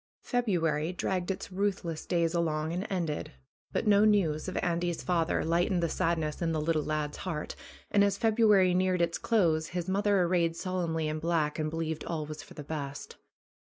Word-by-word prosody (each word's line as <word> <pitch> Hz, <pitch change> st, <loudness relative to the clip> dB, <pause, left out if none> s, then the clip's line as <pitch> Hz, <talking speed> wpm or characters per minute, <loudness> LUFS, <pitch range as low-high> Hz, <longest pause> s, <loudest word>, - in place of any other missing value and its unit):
February 170 Hz, -, 0 dB
dragged 180 Hz, 0 st, -2 dB
its 195 Hz, 0 st, -4 dB
ruthless 185 Hz, -4 st, -2 dB
days 170 Hz, -1 st, +1 dB
along 160 Hz, -2 st, 0 dB
and 180 Hz, +3 st, -3 dB
ended. 170 Hz, -6 st, -2 dB, 0.4 s
But -, -, -1 dB
no 205 Hz, -1 st, +5 dB
news 190 Hz, -8 st, +2 dB
of 185 Hz, -, -3 dB
Andy's 175 Hz, -1 st, -1 dB
father 170 Hz, -2 st, +1 dB
lightened 175 Hz, +2 st, +1 dB
the 170 Hz, -, +1 dB
sadness 160 Hz, -2 st, -1 dB
in 165 Hz, -1 st, 0 dB
the 155 Hz, -, 0 dB
little 155 Hz, 0 st, +1 dB
lad's 150 Hz, -1 st, -2 dB
heart, 165 Hz, -5 st, -4 dB, 0.4 s
and 200 Hz, -, +5 dB
as 200 Hz, -1 st, +2 dB
February 210 Hz, -5 st, +4 dB
neared 185 Hz, -1 st, +2 dB
its 170 Hz, 0 st, -1 dB
close 165 Hz, -8 st, +2 dB
his 175 Hz, 0 st, -4 dB
mother 200 Hz, 0 st, +2 dB
arrayed 170 Hz, -2 st, +1 dB
solemnly 170 Hz, -4 st, -2 dB
in 155 Hz, 0 st, -2 dB
black 160 Hz, -2 st, 0 dB
and 155 Hz, 0 st, 0 dB
believed 160 Hz, -1 st, -3 dB
all 160 Hz, -3 st, -3 dB
was 155 Hz, +1 st, -7 dB
for -, -, -14 dB
the 150 Hz, -, -7 dB
best. 140 Hz, -2 st, -6 dB
170 Hz, 180 wpm, -30 LUFS, 155-185 Hz, 0.4 s, no